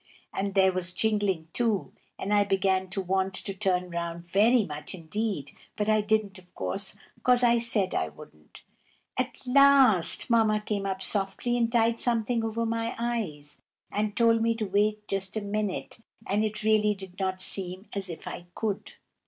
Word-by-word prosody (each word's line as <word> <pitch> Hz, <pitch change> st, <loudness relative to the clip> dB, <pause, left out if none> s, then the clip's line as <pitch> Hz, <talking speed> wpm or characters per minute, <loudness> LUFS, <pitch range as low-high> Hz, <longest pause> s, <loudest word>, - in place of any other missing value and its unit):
and 195 Hz, 0 st, -2 dB
there 190 Hz, -1 st, +5 dB
was 180 Hz, 0 st, -3 dB
jingling, 205 Hz, -5 st, 0 dB
too, 225 Hz, -5 st, 0 dB, 0.2 s
and 205 Hz, -, -2 dB
I 205 Hz, 0 st, +5 dB
began 190 Hz, -1 st, +1 dB
to 195 Hz, +2 st, -3 dB
want 190 Hz, 0 st, 0 dB
to 195 Hz, -, -4 dB
turn 180 Hz, -2 st, 0 dB
round 170 Hz, 0 st, -4 dB
very 215 Hz, +6 st, +4 dB
much 150 Hz, +2 st, -6 dB
indeed; 180 Hz, -3 st, -3 dB, 0.2 s
but 210 Hz, -, -1 dB
I 215 Hz, 0 st, +4 dB
didn't, 210 Hz, -2 st, 0 dB
of 180 Hz, -1 st, -21 dB
course, 200 Hz, 0 st, -4 dB, 0.2 s
'cause 250 Hz, 0 st, +4 dB
I 235 Hz, -1 st, +5 dB
said 220 Hz, -5 st, 0 dB
I 80 Hz, -, 0 dB
wouldn't. 75 Hz, +1 st, -15 dB, 0.5 s
At 255 Hz, 0 st, -2 dB
last 265 Hz, -8 st, +5 dB
Mamma 220 Hz, -2 st, +3 dB
came 205 Hz, -2 st, -2 dB
up 190 Hz, 0 st, -3 dB
softly 205 Hz, +5 st, -1 dB
and 230 Hz, -1 st, +1 dB
tied 230 Hz, -1 st, +2 dB
something 235 Hz, -1 st, +1 dB
over 225 Hz, +1 st, -1 dB
my 230 Hz, 0 st, -2 dB
eyes, 210 Hz, -12 st, -4 dB, 0.3 s
and 210 Hz, 0 st, -2 dB
told 230 Hz, -1 st, +4 dB
me 230 Hz, 0 st, +2 dB
to 225 Hz, -1 st, -2 dB
wait 210 Hz, +2 st, 0 dB
just 195 Hz, +1 st, -2 dB
a -, -, -1 dB
minute; 205 Hz, +1 st, -3 dB, 0.3 s
and 205 Hz, +2 st, +1 dB
it 215 Hz, 0 st, -3 dB
really 210 Hz, -1 st, +3 dB
did 190 Hz, -1 st, -11 dB
not 190 Hz, -1 st, -1 dB
seem 185 Hz, +1 st, -1 dB
as 195 Hz, -2 st, -3 dB
if 165 Hz, -, -8 dB
I 175 Hz, -, -7 dB
could. 210 Hz, -3 st, -3 dB
205 Hz, 175 wpm, -27 LUFS, 190-225 Hz, 0.5 s, there